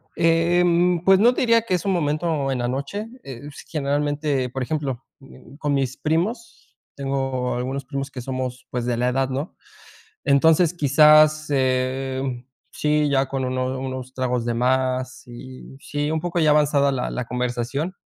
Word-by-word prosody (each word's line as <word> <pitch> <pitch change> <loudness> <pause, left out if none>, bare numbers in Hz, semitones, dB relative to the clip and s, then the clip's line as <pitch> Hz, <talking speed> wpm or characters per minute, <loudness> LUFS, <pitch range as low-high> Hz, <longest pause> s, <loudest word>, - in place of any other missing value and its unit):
Em, 170 +1 +3
pues, 190 0 +6
no 240 +4 +5
te - - -2
diría 230 -2 +4
que 220 -4 -3
es 180 - -3
un 195 - +1
momento 150 -3 0
en 130 - -2
la 120 - -1
noche, 140 - -4 0.2
es, 140 +2 -9
generalmente, 145 -2 -1
por 130 +1 -5
ejemplo, 135 -3 -3 0.2
mm, 135 0 -16
con 145 -1 -2
mis 135 -2 -1
primos, 190 - -3 0.2
tengo 135 -2 -2
algunos 130 +2 -3
primos 140 0 -5
que 125 - -7
somos, 130 -1 -5
pues, 120 -1 -3
de 120 -1 -1
la 125 +1 +1
edad, 135 +1 0
¿no? 135 +5 -4 0.7
Entonces, 160 +4 +4
quizás, 155 0 +5
eh, 130 -1 -1 0.3
sí, 150 0 +1
ya 135 -1 +2
con 130 -1 -3
unos 130 +1 -2
unos 130 -1 -5
tragos 125 -2 -1
de 120 - -1
más, 130 +1 0
y, 130 +2 -11
sí, 145 0 -3
un 160 0 -1
poco 175 +1 -2
ya 155 - +4
avanzada 145 -2 +3
la 130 -2 -2
la 125 - -3
conversación, 125 +7 -3
140 Hz, 165 wpm, -22 LUFS, 130-155 Hz, 0.7 s, pues